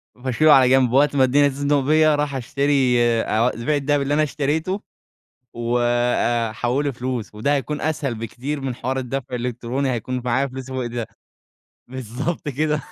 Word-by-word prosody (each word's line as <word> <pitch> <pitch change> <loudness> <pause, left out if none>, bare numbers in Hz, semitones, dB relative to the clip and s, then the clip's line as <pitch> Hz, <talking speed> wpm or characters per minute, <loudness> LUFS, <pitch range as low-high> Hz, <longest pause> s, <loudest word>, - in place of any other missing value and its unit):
وابقى 130 +1 -6
اشيله 155 +4 +5
على 130 -2 +6
جنب 130 -2 +4
وقت 140 +2 +3
اما 135 - +4
الدنيا 145 +3 +4
تُزنق 145 +1 0
بيا 155 +2 +3
أروح 145 -1 -1
أشتري 135 -1 +1
أ 115 0 +2
أبيع 120 +6 -2
الدهب 145 0 +1
اللي 140 +1 -1
أنا 155 +1 +3
اشتريته 155 +7 -1 0.7
وأحوله 120 +2 0
فلوس 125 -3 -5
وده 140 +7 0
هيكون 145 +2 -3
أسهل 145 -6 -2
بكتير 130 +6 -5
من 130 -3 -3
حوار 130 +2 -3
الدفع 130 0 -4
الإلكتروني. 125 +2 -2
هيكون 125 +2 -3
معايا 130 +3 +1
فلوس 130 0 -8
وإيداع 120 -3 -3 0.8
بالضبط 130 +6 -4
كده. 150 +1 -1
130 Hz, 155 wpm, -21 LUFS, 120-145 Hz, 0.8 s, على